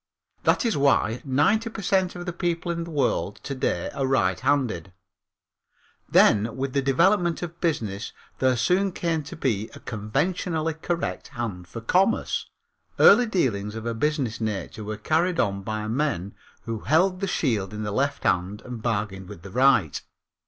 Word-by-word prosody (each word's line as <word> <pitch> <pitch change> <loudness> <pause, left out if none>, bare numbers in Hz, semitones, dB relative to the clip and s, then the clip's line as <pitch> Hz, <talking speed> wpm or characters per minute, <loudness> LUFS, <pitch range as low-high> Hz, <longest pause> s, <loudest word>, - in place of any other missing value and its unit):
That - - +3
is 230 - +1
why 135 -4 +2
ninety 155 - +2
per 220 -2 -7
cent 190 -1 +1
of 175 0 -6
the 175 - -3
people 175 0 -1
in 170 0 -3
the - - -9
world 150 -4 0
to 140 - -4
day 130 - -1
are 135 - -1
righthanded. 110 - +1 1.2
Then 110 +3 +4
with 135 0 -2
the 140 - +2
development 170 +5 +2
of 170 0 -7
business 110 - -1 0.3
there 130 -1 +3
soon 180 +10 +2
came 165 -2 -1
to 145 +3 -9
be 115 -9 -1
a - - -10
conventionally 155 - -1
correct 170 +2 -3
hand 110 -9 -5
for 115 +7 -7
commerce. 185 - +1 0.5
Early 235 +4 +7
dealings 110 - 0
of 110 0 -6
a 115 - -1
business 130 -2 -1
nature 110 0 -3
were 105 0 -4
carried 165 - +1
on 100 -1 +1
by 110 +1 -3
men 110 - -1 0.3
who 115 -1 -4
held 180 - +2
the 195 - -1
shield 110 - 0
in 105 0 -5
the 105 - -3
left 140 +5 -1
hand 90 +3 0
and 125 -3 -7
bargained 100 -5 -2
with 85 - -10
the 100 - -9
right. 125 - +3
135 Hz, 165 wpm, -25 LUFS, 105-170 Hz, 1.2 s, Early